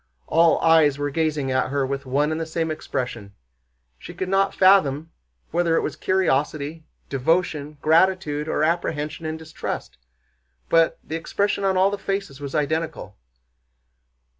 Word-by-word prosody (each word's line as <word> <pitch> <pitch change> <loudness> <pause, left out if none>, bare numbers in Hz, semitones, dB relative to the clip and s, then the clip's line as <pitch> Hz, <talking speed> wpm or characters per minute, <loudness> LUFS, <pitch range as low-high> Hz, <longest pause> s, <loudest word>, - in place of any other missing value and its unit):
All 165 +1 +4
eyes 160 -4 +4
were 145 0 -2
gazing 150 -3 -1
at 130 0 +1
her 140 0 0
with 140 0 -4
one 145 +4 +1
and 155 +1 -2
the - - -2
same 160 0 -2
expression. 120 -9 -5 0.6
She - - -10
could 185 - -3
not 195 0 +2
fathom 165 -5 +4 0.4
whether 170 -1 +1
it - - +2
was - - -3
curiosity, 155 -3 -1 0.2
devotion, 150 +1 -1
gratitude, 160 -2 +2
or 155 - 0
apprehension 160 -1 -1
and 155 0 -3
distrust—but 60 - -3
the 160 - -5
expression 200 +5 -1
on 190 -1 +2
all 190 +2 +4
the 205 - -4
faces 195 -9 -4
was 140 +1 -5
identical. 155 - -2
155 Hz, 140 wpm, -23 LUFS, 140-170 Hz, 0.6 s, All